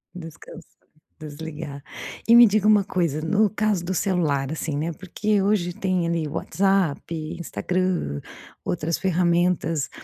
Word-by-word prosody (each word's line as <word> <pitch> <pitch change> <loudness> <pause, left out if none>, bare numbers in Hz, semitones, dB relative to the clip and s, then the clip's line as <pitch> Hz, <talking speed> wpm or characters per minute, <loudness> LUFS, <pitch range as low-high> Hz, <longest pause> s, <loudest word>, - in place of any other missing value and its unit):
Descans 165 0 -10 0.5
desligar. 150 -1 -7 0.5
E 235 - +7
me 240 0 +10
diga 210 0 +2
uma 210 -2 +5
coisa, 170 -6 -1
no 205 +6 +2
caso 210 -4 0
do 190 - -2
celular, 155 -8 0
assim, 160 -1 -3
né, 160 +3 -2
porque 200 +4 -1
hoje, 190 -3 +1
tem, 185 -2 -1
ali, 165 -2 -1
WhatsApp, 190 0 0 0.4
Instagram, 170 - -1 0.5
outras 165 -1 -1
ferramentas 175 -4 +1
175 Hz, 125 wpm, -24 LUFS, 155-195 Hz, 0.5 s, me